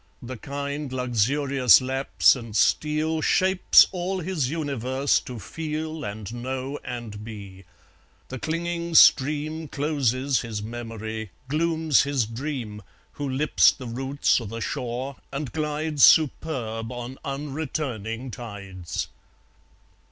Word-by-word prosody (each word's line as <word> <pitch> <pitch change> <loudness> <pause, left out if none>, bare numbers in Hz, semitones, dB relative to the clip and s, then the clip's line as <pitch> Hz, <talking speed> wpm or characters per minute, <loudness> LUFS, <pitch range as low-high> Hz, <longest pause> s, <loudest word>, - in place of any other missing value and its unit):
The 130 +2 -6
kind 140 +2 -5
luxurious 125 0 +3
lapse 135 +2 +3
and 115 -4 -8
steal 155 +5 +2
Shapes 185 +3 +5
all 185 +1 -2
his 165 -7 -1
universe 140 -3 0
to 125 - -8
feel 155 +5 -5
And 105 +1 -6
know 130 +3 -4
and 115 -4 -6
be; 100 -4 -10 0.6
the 130 - -6
clinging 170 +2 -3
stream 155 +3 +5
Closes 140 -3 0
his 110 -3 -5
memory, 110 -1 -6 0.2
glooms 160 0 +2
his 140 -4 0
dream, 115 -3 -5 0.3
Who 145 -1 -4
lips 135 +4 +4
the 130 - -10
roots 130 +3 0
o' - - -6
the 115 +3 -6
shore, 125 +4 -4
and 140 -2 -4
glides 150 -1 -1
Superb 125 -7 +3
on 120 +1 -7
unreturning 135 -5 -4
tides. 100 -7 -6
135 Hz, 115 wpm, -25 LUFS, 115-150 Hz, 0.6 s, Shapes